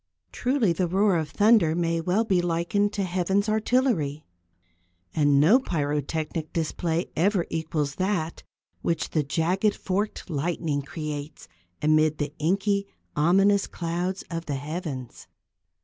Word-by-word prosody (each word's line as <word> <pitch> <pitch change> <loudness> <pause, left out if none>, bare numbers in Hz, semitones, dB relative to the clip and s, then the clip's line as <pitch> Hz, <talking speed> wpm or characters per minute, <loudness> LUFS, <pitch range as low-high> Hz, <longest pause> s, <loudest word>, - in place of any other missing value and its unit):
Truly 245 -8 +1
the 180 +1 0
roar 195 +2 +3
of 155 -3 -2
the - - -24
thunder 205 -7 +5
may 165 -1 0
well 185 +7 +1
be 190 -5 +2
likened 175 +4 0
to 200 - -1
Heaven's 190 +3 0
artillery, 215 - +1 0.9
and 145 -2 +3
no 185 - +6
pyrotechnic 155 - -2
display 165 +1 -1
ever 185 +1 +2
equals 155 -3 -2
that 185 -4 -1 0.4
which 170 - -1
the 155 - +2
jagged, 175 +8 +1
forked 200 +3 -2
lightning 160 -2 -1
creates 150 0 -6 0.4
amid 155 0 +3
the 145 -1 -3
inky, 200 +5 +1 0.3
ominous 195 +6 +3
clouds 175 +2 -3
of 165 0 -4
the 145 - -1
heavens. 145 -3 -6
170 Hz, 130 wpm, -26 LUFS, 155-195 Hz, 0.9 s, no